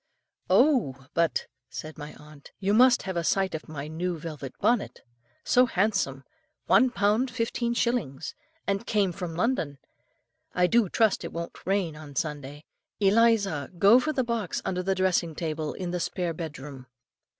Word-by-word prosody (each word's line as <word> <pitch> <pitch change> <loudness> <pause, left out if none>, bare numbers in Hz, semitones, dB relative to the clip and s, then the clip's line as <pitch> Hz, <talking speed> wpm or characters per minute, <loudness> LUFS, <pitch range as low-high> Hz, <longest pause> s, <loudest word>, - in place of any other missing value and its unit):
"'Oh! 180 - +3
but,' 170 -1 +1 0.2
said 155 0 -7
my 150 0 -9
aunt, 150 -1 -15
'you 200 +1 +1
must 245 +2 +5
have 190 -1 -4
a 170 - 0
sight 190 +3 +1
of 160 0 -6
my 145 -2 -6
new 170 +3 -3
velvet 150 -4 -7
bonnet, 235 -3 +1 0.4
so 250 0 +4
handsome, 190 - 0 0.4
one 260 - +5
pound 220 +2 +1
fifteen 235 0 -1
shillings, 200 - -1 0.3
and 200 +3 -2
came 205 -4 +2
from 175 -2 -6
London. 170 - 0 0.8
I 180 - +4
do 225 +1 +3
trust 220 +1 +2
it - - -5
won't 170 +1 -7
rain 190 -5 0
on 150 -2 -11
Sunday. 145 0 -4 0.3
Eliza, 200 -7 +3
go 205 +7 +7
for 310 +4 -1
the 265 -4 0
box 230 -6 -2
under 180 -1 -1
the 190 +1 0
dressing 185 -3 +1
table 155 -2 -3
in 180 -2 -4
the 180 - -2
spare 175 0 -2
bedroom. 145 -5 -8
180 Hz, 160 wpm, -27 LUFS, 155-220 Hz, 0.8 s, go